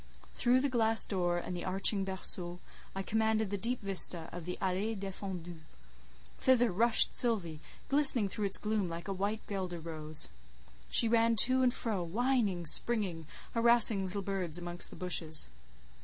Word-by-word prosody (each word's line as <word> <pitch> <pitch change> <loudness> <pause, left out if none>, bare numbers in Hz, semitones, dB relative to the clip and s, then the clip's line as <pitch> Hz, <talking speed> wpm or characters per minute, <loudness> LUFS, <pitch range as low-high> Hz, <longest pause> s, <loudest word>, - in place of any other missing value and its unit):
Through 250 +1 +1
the 280 - 0
glass 225 -4 +4
door 175 -3 -2
and 180 +1 -6
the 175 - -7
arching 195 +2 +1
berceau, 180 -2 -2 0.4
I 195 - -4
commanded 220 -1 -1
the - - -2
deep 240 +4 -2
vista 185 -4 +2
of 175 -2 -9
the 180 - -6
allée 195 +4 -3
défendue: 185 -3 -8 0.8
thither 245 -3 +2
rushed 225 +5 +4
Sylvie, 190 -11 0 0.3
glistening 270 -6 +6
through 205 +2 -4
its 195 - 0
gloom 210 -4 -3
like 170 0 -8
a 195 - -4
white 205 +3 -4
guelder 185 -4 -6
rose. 155 - -4 0.6
She 230 - +2
ran 230 0 +1
to 260 +1 0
and 250 -1 +2
fro, 220 -6 -2
whining, 205 -1 -2
springing, 180 -3 +2 0.3
harassing 230 -3 +3
little 195 +2 -5
birds 185 -4 -4
amongst 175 0 -3
the - - -13
bushes. 160 - +1
195 Hz, 155 wpm, -30 LUFS, 175-225 Hz, 0.8 s, glistening